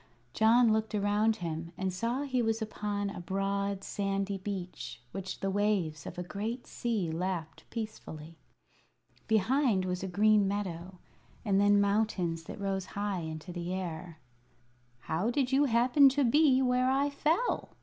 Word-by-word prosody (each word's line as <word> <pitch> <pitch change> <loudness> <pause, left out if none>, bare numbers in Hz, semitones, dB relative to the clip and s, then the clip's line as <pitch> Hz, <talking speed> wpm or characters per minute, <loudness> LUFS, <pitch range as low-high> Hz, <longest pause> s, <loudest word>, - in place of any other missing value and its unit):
John 225 +1 +5
looked 220 0 -1
around 210 +2 +2
him 165 -2 -5
and 190 -1 -2
saw 235 +8 -1
he 260 -3 0
was 225 -1 0
upon 205 -2 -3
a 200 - -7
broad, 195 +2 -2
sandy 195 0 -2
beach 185 - -6
which 190 0 -6
the 195 - 0
waves 190 -7 0
of - - -8
a 180 - -3
great 215 +7 -4
sea 215 -9 -2
lapped 165 -1 -4
peacefully. 165 -8 -7 0.9
Behind 220 -1 +2
was 180 0 -2
a 190 - -3
green 205 +2 +4
meadow, 185 -2 -4 0.5
and 200 -2 +3
then 205 0 +5
mountains 200 -5 0
that - - -8
rose 195 -2 -2
high 205 -2 -1
into 160 +2 -6
the 175 +1 -3
air. 170 -2 -5 0.8
"How 170 - -1
did 255 +1 0
you 275 +2 +4
happen 255 +3 +5
to 285 - +4
be 265 +1 +4
where 250 0 +2
I 275 +2 +2
fell?" 320 +11 0
200 Hz, 150 wpm, -31 LUFS, 180-225 Hz, 0.9 s, John